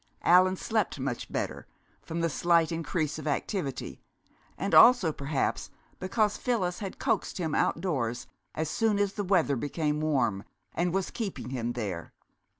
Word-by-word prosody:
Allan 185 +1 +5
slept 215 -5 -1
much 130 -2 -4
better, - - -3 0.3
from 165 +1 -4
the 165 - +2
slight 170 +1 +2
increase 155 -1 -2
of 155 - -6
activity, 145 - -3 0.6
and 195 +3 -3
also 235 -9 +7
perhaps 140 0 -2 0.3
because 210 +3 0
Phyllis 195 -8 -1
had 195 -3 -6
coaxed - - -1
him 160 -5 -2
outdoors 135 -9 0 0.3
as 160 0 -1
soon 220 +4 +1
as 200 -1 +1
the 205 - -3
weather 175 -8 +2
became 150 +3 -1
warm, 120 -10 +1 0.3
and 175 +1 0
was 190 +1 -1
keeping 195 - -5
him 120 -2 -2
there. 100 -8 -5
165 Hz, 150 wpm, -28 LUFS, 140-190 Hz, 0.6 s, also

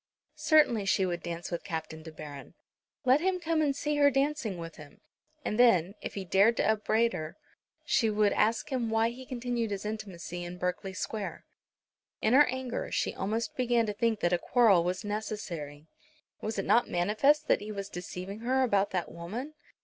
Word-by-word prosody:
Certainly 290 -10 +4
she 195 -1 +3
would 175 -2 -2
dance 170 0 -5
with 170 - -3
Captain 160 -2 -5
De 160 0 -10
Baron. 150 -3 -10 0.5
Let 260 +4 +5
him 370 0 +1
come 330 -2 0
and 285 -3 +1
see 295 +1 -1
her 285 -1 +6
dancing 275 -7 0
with 165 -1 -8
him; 145 -2 -13 0.5
and 210 - -2
then, 195 -7 +5
if - - -6
he 195 -2 -4
dared 200 +6 +4
to - - +2
upbraid 220 +2 +2
her, 155 0 -6 0.5
she 225 - +2
would 210 -1 +2
ask 225 +6 +1
him 245 -4 -1
why 225 +1 +2
he 255 +2 -10
continued 240 -2 -2
his 200 0 -4
intimacy 185 -5 -5
in 175 +1 -7
Berkeley 180 +2 -3
Square. 210 0 -4 0.7
In 220 - +2
her 290 +3 +7
anger 255 -1 -3
she - - 0
almost 220 +4 -2
began 240 -2 +2
to 210 - -2
think 225 +1 0
that 175 - +2
a 175 - +2
quarrel 210 -5 +4
was 180 +4 -2
necessary. 185 -9 -5 0.6
Was 215 0 -3
it 195 - -1
not 240 - +3
manifest 220 +12 +2
that - - +3
he 210 +1 -6
was 200 -1 -5
deceiving 180 +2 -7
her 260 +3 +1
about 200 -5 +2
that 180 -3 -3
woman? 220 - -6
215 Hz, 190 wpm, -30 LUFS, 180-245 Hz, 0.7 s, her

